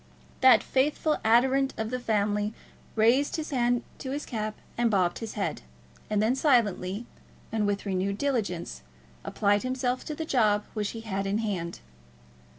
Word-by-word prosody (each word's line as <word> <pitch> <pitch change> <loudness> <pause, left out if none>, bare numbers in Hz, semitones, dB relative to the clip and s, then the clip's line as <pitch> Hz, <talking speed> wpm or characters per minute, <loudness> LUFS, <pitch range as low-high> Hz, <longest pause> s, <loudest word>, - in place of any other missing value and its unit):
That 260 -1 +7
faithful 300 +3 +1
adherent 265 +4 +3
of 220 0 -3
the 250 - -1
family 210 -2 0 0.4
raised 235 +6 +3
his 315 -1 -4
hand 245 -2 +1 0.2
to 260 - -5
his 285 +2 -3
cap 215 -2 -3 0.2
and 240 -1 +2
bobbed 185 -4 +1
his 225 -2 -6
head, 205 - -2 0.5
and 210 - +1
then 220 +4 +3
silently, 230 - +1 0.5
and 215 -2 +1
with 205 0 -1
renewed 195 0 -1
diligence, 220 -11 -2 0.4
applied 205 0 +1
himself 255 0 -1
to 305 - -4
the 320 - -4
job 215 -8 +2
which 210 -2 -2
he - - -6
had 195 -3 -3
in 200 +2 +1
hand. 190 -6 -3
220 Hz, 155 wpm, -28 LUFS, 205-255 Hz, 0.5 s, That